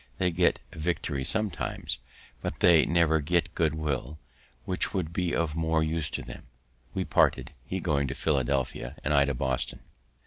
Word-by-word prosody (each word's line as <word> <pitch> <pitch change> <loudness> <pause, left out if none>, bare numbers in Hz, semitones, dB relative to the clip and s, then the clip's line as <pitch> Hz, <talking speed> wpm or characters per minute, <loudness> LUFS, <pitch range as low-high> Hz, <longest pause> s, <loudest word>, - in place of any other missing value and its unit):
They 90 - +2
get 85 +1 +2
victory 75 -4 -2
sometimes, 100 - 0 0.4
but - - -4
they 85 -3 +6
never 85 -2 +3
get 85 +2 0
good 80 -2 +1
will, 75 -2 -3 0.5
which 90 +1 0
would 85 -4 -2
be 90 -1 0
of 80 -3 0
more 80 -1 +1
use 80 -1 -1
to - - -4
them. - - -10 0.5
We - - -1
parted, - - +2
he 95 - -2
going 75 -6 0
to 65 - -4
Philadelphia, 65 -4 -1
and 75 - +1
I 70 -1 +5
to 70 -1 -1
Boston. 65 0 -1
80 Hz, 165 wpm, -28 LUFS, 70-85 Hz, 0.5 s, they